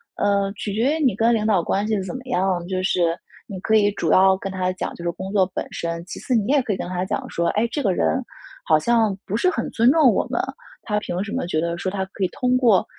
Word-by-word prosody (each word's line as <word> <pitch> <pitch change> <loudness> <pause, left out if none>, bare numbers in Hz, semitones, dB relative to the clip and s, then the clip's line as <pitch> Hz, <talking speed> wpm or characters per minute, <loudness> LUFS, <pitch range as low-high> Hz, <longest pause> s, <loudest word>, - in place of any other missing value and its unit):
呃， 200 -1 +1
取 205 0 -5
决 260 +9 +1
于 315 - -1
你 255 -8 +3
跟 225 +3 +3
领 215 -1 -1
导 205 -5 +3
关 200 +4 -1
系 215 -3 0
怎 185 - -6
么 260 - -6
样， 185 -6 0
就 185 0 -2
是 175 -3 +1 0.3
你 195 -4 -7
可 220 +4 +1
以 205 -1 +4
主 170 -5 -2
要 190 0 +5
跟 195 0 -5
他 185 -1 -1
讲， - - -4
就 170 - -9
是 170 - 0
工 190 +3 -7
作 195 -3 +4
本 - - -3
身， 170 0 -4
其 185 - -8
次 255 - -2
你 215 -3 +1
也 285 - +4
可 235 - -3
以 - - -3
跟 - - -4
他 180 0 -2
讲 - - -3
说： 170 0 -1
“哎， 230 - +2
这 290 - -2
个 195 -5 +2
人 260 +8 0 0.4
好 155 - +4
像 220 0 +2
不 205 - -3
是 365 - +3
很 330 - -2
尊 235 +2 +4
重 290 -6 +5
我 - - 0
们， - - -1 0.4
他 210 -2 -1
凭 180 -3 -4
什 205 - -7
么 260 - -1
觉 155 -3 0
得 170 0 -2
说， 185 +2 -3
他 190 -1 -2
可 195 - -3
以 - - +3
通 250 +6 +1
过 230 -7 +4
200 Hz, 295 characters per minute, -22 LUFS, 185-230 Hz, 0.4 s, 要